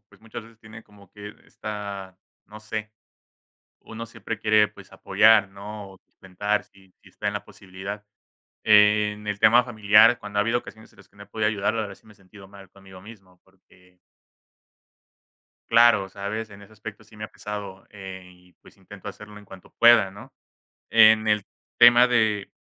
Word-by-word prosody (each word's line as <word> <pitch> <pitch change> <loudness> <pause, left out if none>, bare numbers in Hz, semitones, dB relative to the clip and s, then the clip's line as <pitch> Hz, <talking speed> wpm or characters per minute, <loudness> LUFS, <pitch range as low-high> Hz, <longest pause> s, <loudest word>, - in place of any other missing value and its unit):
pues, - - -23
muchas 115 0 -10
veces 115 -1 -20
tiene 110 0 -14
como 100 -3 -21
que 105 +1 -11
esta, 100 -3 -8 0.3
no 110 +1 -13
sé, 110 0 -6 0.9
uno 115 +1 -9
siempre 115 -1 -7
quiere, 105 0 +3
pues 105 - -17
apoyar, 110 -2 +3
¿no?, 100 0 -10
sustentar, 105 +3 -4
si 95 -1 -25
si - - -19
está - - -11
en - - -2
la - - -5
posibilidad. 100 +2 -10 0.6
En 105 0 +3
el 105 -1 -4
tema 115 +3 +5
familiar 110 0 +4
cuando 105 -1 -8
ha - - +4
habido 115 +3 0
ocasiones 110 -1 -15
en - - -27
las 95 - -20
que - - -32
no 100 - -12
he - - -17
podido 105 +1 -2
ayudar 105 0 -2
a 110 -2 -3
ver 100 - -11
si - - -27
me 110 - -18
sentido 95 0 -17
mal 100 -1 -16
conmigo 95 -1 -16
mismo 95 -4 -16
porque 90 -1 -27 1.7
claro, 115 -4 +4
¿sabes?, 100 +3 -6
en 100 0 -14
ese 100 - -17
aspecto 110 0 -11
sí 110 +1 -20
me 105 - -7
ha - - -9
pesado, 100 -2 -9
eh, 95 -2 -10
y 90 0 -23
pues - - -21
intento 100 +1 -12
hacerlo 105 +1 -12
en 105 - -16
cuanto 95 -2 -15
pueda, 115 -4 +6
¿no?, 100 +2 -14 0.6
en 110 -1 +5
el 105 -2 +1 0.3
tema 120 +1 +7
de 110 -4 0
105 Hz, 180 wpm, -24 LUFS, 100-110 Hz, 1.7 s, tema